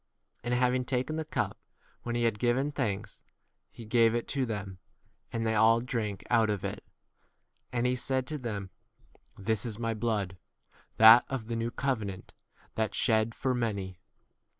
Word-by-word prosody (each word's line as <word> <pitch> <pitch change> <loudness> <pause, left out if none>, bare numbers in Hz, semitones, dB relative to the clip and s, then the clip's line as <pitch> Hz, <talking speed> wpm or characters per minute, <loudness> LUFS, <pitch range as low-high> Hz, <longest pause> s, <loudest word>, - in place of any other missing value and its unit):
And 120 +1 0
having 125 +1 +2
taken 130 +4 -1
the 160 - -2
cup, 155 - -2 0.4
when 120 0 -3
he 120 - +1
had 115 -3 +1
given 130 +5 +1
thanks, 105 -9 -3 0.5
he 115 - -11
gave 115 +1 +4
[it] 120 - -2
to 135 -3 0
them, 100 -4 -5 0.5
and 115 0 -2
they 110 - +1
all 110 +1 +5
24 120 - -7
drank 105 -6 -3
out 115 -2 +4
of 105 -3 -2
it. - - -5 0.9
And 120 0 0
he 125 0 +2
said 130 +1 -1
to 150 +2 -4
them, 105 -6 -5 0.7
This 105 +1 -1
is 110 -4 -4
my 115 -1 -1
blood, 105 -4 -1 0.6
that 110 +2 +9
of 135 -5 -3
the 115 +1 -3
new 115 +1 -1
covenant, 110 -8 -3 0.4
that 110 -1 -1
shed 110 -1 +2
for 130 - -1
25 125 - -1 0.2
many. 95 -2 -6
115 Hz, 175 wpm, -30 LUFS, 105-125 Hz, 0.9 s, that